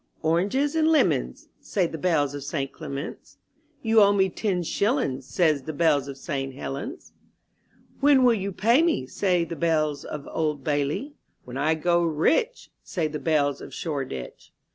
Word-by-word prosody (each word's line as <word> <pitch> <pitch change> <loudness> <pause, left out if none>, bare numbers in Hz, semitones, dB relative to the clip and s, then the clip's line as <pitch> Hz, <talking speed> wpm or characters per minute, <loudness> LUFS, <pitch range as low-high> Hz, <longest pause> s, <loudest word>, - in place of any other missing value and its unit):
* - - -37
'Oranges 200 - +1
and 315 -1 +3
lemons," 320 -1 +1
Say 190 -5 0
the 165 - -5
bells 145 -5 +1
of 145 -1 -6
St. 135 -2 -3
Clement^s, 140 -2 -6 0.7
^*You 225 0 +5
owe 200 0 +6
me 190 -1 +3
ten 185 -1 -1
shillings," 165 - -1
Say 165 +2 +3
the 150 +1 -4
bells 145 -3 +2
of 140 -1 -7
St. 135 -2 -4
Helen's. 180 - -6 0.9
When 275 -2 +5
will 245 -1 +6
you 200 -2 -2
pay 230 - +3
me?" 330 - +1
Say 180 +4 +1
the 170 - -5
bells 155 -2 0
of 145 -2 -7
Old 150 -3 -1
Bailey. 145 - -1 0.3
When 125 - -9
I 155 +4 +1
grow 175 +2 +2
rich," 245 - 0
Say 170 -5 -2
the 150 0 -5
bells 145 -3 +1
of - - -9
Shoreditch. 135 - -5
160 Hz, 165 wpm, -25 LUFS, 145-200 Hz, 0.9 s, owe